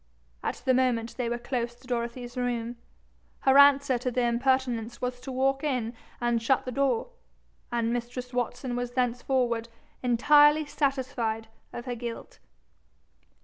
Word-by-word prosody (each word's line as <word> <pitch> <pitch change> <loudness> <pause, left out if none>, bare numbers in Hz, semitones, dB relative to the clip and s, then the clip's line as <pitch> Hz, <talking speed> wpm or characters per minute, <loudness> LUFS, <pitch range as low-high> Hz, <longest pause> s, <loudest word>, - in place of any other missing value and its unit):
At - - -3
the 260 - +4
moment 240 -3 +1
they 245 -1 -2
were 240 - -1
close 240 -1 -3
to 250 +2 -21
Dorothy's 240 0 -4
room; 240 -1 -2 0.6
her 265 0 +4
answer 280 -3 +6
to 250 - -1
the 250 0 0
impertinence 240 -1 0
was 250 0 -3
to 260 +2 -7
walk 270 +2 +1
in 250 -6 -1 0.3
and 240 -1 +1
shut 255 +3 +2
the 255 - -3
door; 275 - 0 0.6
and 235 -1 0
mistress 245 +1 -4
Watson 245 +1 -2
was 245 0 -3
thenceforward 245 -1 0 0.3
entirely 295 +5 +5
satisfied 255 -6 -1 0.2
of 240 - -7
her 250 - -3
guilt. 235 -1 -7
245 Hz, 145 wpm, -28 LUFS, 235-260 Hz, 0.6 s, answer